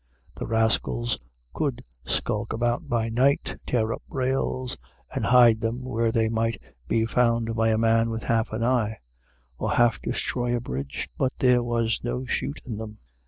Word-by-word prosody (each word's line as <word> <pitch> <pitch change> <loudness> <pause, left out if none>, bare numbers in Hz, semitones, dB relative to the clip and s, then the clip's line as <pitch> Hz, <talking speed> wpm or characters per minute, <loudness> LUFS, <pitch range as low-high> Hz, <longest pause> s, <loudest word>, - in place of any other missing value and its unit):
The - - -6
rascals 115 +1 +1 0.3
could - - -2 0.2
skulk - - -1
about 120 +1 -1
by 115 -1 +1
night, 130 +5 +1
tear 115 -2 +1
up - - -7
rails, 130 -1 -1 0.4
and - - -1
hide 120 -3 +6
them 120 +3 -2
where 115 -2 0
they 110 0 +2
might 115 0 0 0.3
be 115 -1 +2
found 115 -1 +1
by 115 0 +2
a 110 - +2
man 115 0 +3
with 115 0 -4
half 115 -1 +1
an 110 +1 -2
eye, 115 -3 +1 0.6
or - - 0
half 120 -1 +3
destroy 120 0 -1
a - - 0
bridge; 70 - -4
but 130 -1 +1
there 125 -1 +4
was 115 -2 0
no 125 +2 -2
shoot 140 +3 -2
in 115 -4 -5
them. 110 -1 -7
115 Hz, 165 wpm, -26 LUFS, 110-125 Hz, 0.6 s, hide